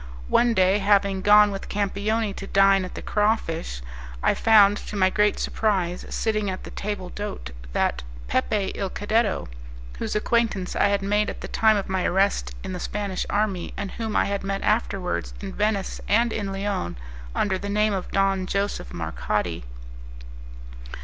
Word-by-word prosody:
One 235 Hz, -1 st, +3 dB
day, 190 Hz, +1 st, +4 dB
having 200 Hz, -1 st, +2 dB
gone 210 Hz, +1 st, +6 dB
with 195 Hz, -, -6 dB
Campioni 205 Hz, +1 st, -1 dB
to 195 Hz, -, -6 dB
dine 195 Hz, -1 st, +4 dB
at 180 Hz, -, -9 dB
"The -, -, -7 dB
Crawfish," 170 Hz, -, -1 dB, 0.4 s
I -, -, +4 dB
found, 205 Hz, -2 st, +5 dB
to 210 Hz, -, -8 dB
my 190 Hz, -1 st, +3 dB
great 210 Hz, +1 st, +2 dB
surprise, 185 Hz, -5 st, -1 dB
sitting 215 Hz, -2 st, -1 dB
at 185 Hz, -, -5 dB
the -, -, -9 dB
table 200 Hz, -3 st, -4 dB
d'hote, 190 Hz, -, -6 dB, 0.2 s
that -, -, +1 dB, 0.3 s
Pepe 195 Hz, -, 0 dB
il 195 Hz, -2 st, -3 dB
Cadetto, 210 Hz, +1 st, 0 dB, 0.5 s
whose -, -, -3 dB
acquaintance 210 Hz, -4 st, 0 dB
I -, -, +4 dB
had 200 Hz, -1 st, 0 dB
made 205 Hz, +1 st, +1 dB
at -, -, -7 dB
the -, -, -5 dB
time 220 Hz, -1 st, +3 dB
of 200 Hz, -, -3 dB
my 190 Hz, -1 st, -1 dB
arrest 195 Hz, +2 st, +1 dB
in 190 Hz, -1 st, -5 dB
the 180 Hz, -, -4 dB
Spanish 200 Hz, 0 st, -3 dB
army, 200 Hz, -4 st, -1 dB
and 200 Hz, -1 st, -4 dB
whom 220 Hz, -2 st, -4 dB
I -, -, +3 dB
had 200 Hz, 0 st, -2 dB
met 195 Hz, 0 st, -2 dB
afterwards 195 Hz, -4 st, -1 dB
in 195 Hz, -2 st, -6 dB
Venice 210 Hz, -2 st, -1 dB
and 230 Hz, +3 st, +3 dB
in 205 Hz, -3 st, -3 dB
Lyons, 195 Hz, -, -3 dB, 0.4 s
under 190 Hz, -2 st, +1 dB
the 200 Hz, -, -5 dB
name 210 Hz, +1 st, +2 dB
of 190 Hz, -2 st, -3 dB
Don 195 Hz, -1 st, +1 dB
Joseph 200 Hz, -, -2 dB
Marcati. 85 Hz, -11 st, -2 dB
200 Hz, 170 wpm, -24 LUFS, 190-210 Hz, 0.5 s, gone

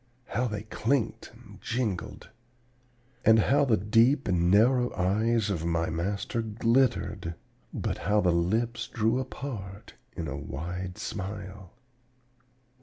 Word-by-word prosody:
How 125 Hz, +2 st, 0 dB
they 105 Hz, -2 st, -4 dB
clinked 115 Hz, +3 st, -1 dB
and -, -, -16 dB
jingled! 115 Hz, -7 st, -3 dB, 0.9 s
And 110 Hz, 0 st, +6 dB
how 140 Hz, +6 st, +3 dB
the 115 Hz, -5 st, +3 dB
deep 115 Hz, +8 st, +3 dB
and 85 Hz, -2 st, +2 dB
narrow 120 Hz, +5 st, +4 dB
eyes 110 Hz, +3 st, +1 dB
of 85 Hz, -5 st, -2 dB
my 85 Hz, -1 st, 0 dB
master 100 Hz, +7 st, -2 dB
glittered, 115 Hz, -5 st, +1 dB, 0.4 s
but -, -, -3 dB
how 105 Hz, +1 st, +2 dB
the 90 Hz, -3 st, +3 dB
lips 115 Hz, +7 st, 0 dB
drew 115 Hz, +2 st, +1 dB
apart 115 Hz, -6 st, -7 dB, 0.2 s
in 85 Hz, -3 st, -4 dB
a 70 Hz, -, -4 dB
wild 90 Hz, +6 st, -5 dB
smile! 95 Hz, -2 st, -6 dB
105 Hz, 120 wpm, -28 LUFS, 90-115 Hz, 0.9 s, And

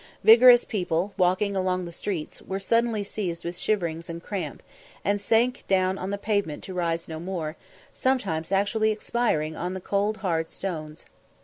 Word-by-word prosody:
Vigorous 240 Hz, +3 st, +8 dB
people, 185 Hz, -2 st, -1 dB
walking 185 Hz, +2 st, +2 dB
along 185 Hz, -1 st, 0 dB
the 170 Hz, -, -7 dB
streets, 170 Hz, -2 st, -4 dB
were 190 Hz, -, -4 dB
suddenly 230 Hz, +1 st, +1 dB
seized 180 Hz, -5 st, -4 dB
with 170 Hz, +1 st, -3 dB
shiverings 170 Hz, -5 st, -1 dB
and 170 Hz, +1 st, -6 dB
cramp, 200 Hz, -3 st, -5 dB, 0.4 s
and 205 Hz, 0 st, +1 dB
sank 235 Hz, +4 st, +2 dB
down 190 Hz, 0 st, +2 dB
on 185 Hz, -, -4 dB
the 200 Hz, -, -2 dB
pavement 200 Hz, -7 st, -1 dB
to 190 Hz, -, -7 dB
rise 170 Hz, -2 st, -1 dB
no 160 Hz, -1 st, -6 dB
more, 170 Hz, -3 st, -4 dB, 0.4 s
sometimes 195 Hz, -11 st, -1 dB
actually 205 Hz, +3 st, +2 dB
expiring 210 Hz, -8 st, 0 dB
on 180 Hz, +3 st, -3 dB
the -, -, -4 dB
cold, 200 Hz, +3 st, 0 dB
hard 165 Hz, -6 st, -1 dB
stones. 155 Hz, -5 st, -6 dB
190 Hz, 165 wpm, -26 LUFS, 170-210 Hz, 0.4 s, Vigorous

